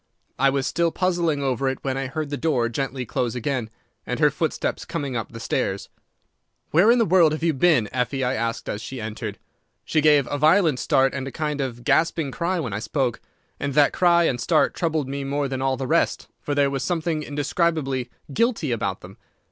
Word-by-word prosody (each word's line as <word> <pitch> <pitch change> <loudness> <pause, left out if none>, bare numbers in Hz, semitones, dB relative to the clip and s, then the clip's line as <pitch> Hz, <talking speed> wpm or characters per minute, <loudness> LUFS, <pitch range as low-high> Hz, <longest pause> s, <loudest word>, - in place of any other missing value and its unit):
I 135 +1 +5
was 135 -1 0
still 170 -1 +1
puzzling 170 -6 0
over 135 0 0
it 130 - -3
when 135 -1 -1
I 135 0 -2
heard 150 +2 -4
the - - 0
door 135 -7 0
gently 130 +1 -3
close 120 +2 -2
again, 125 -2 -2 0.3
and - - -4
her - - +4
footsteps - - -2
coming 140 -3 -4
up 115 - -4
the 115 - -8
stairs. 100 -3 -2 0.8
"'Where 175 +8 +5
in 240 - +6
the 230 - +3
world 170 -4 +4
have 155 - -4
you 165 -1 +2
been, 140 -6 +3
Effie?' 130 +2 -1
I 125 0 +1
asked 115 -2 -2
as 105 - -3
she 130 +2 -7
entered. 110 -1 -5 0.5
"She 155 - +1
gave 150 -2 +5
a 145 - -1
violent 155 -2 +4
start 135 +2 +2
and 135 -1 -4
a - - -5
kind 150 -1 -2
of 120 -3 -4
gasping 160 +1 +1
cry 175 +4 -1
when 125 -10 -3
I 100 - -2
spoke, 125 0 -1 0.4
and 140 -2 -3
that 145 -1 +5
cry 170 -1 +4
and 125 -7 0
start 160 -3 +2
troubled 160 -5 -1
me 140 +1 -4
more 140 +1 -1
than 130 -1 -4
all 135 -1 +1
the 135 - -3
rest, - - +1
for 145 - -3
there 140 -1 +3
was 135 -1 -2
something 165 0 -1
indescribably 145 -3 -1 0.2
guilty 230 - +1
about 100 -5 -2
them. 95 +2 -12
140 Hz, 210 wpm, -23 LUFS, 125-160 Hz, 0.8 s, in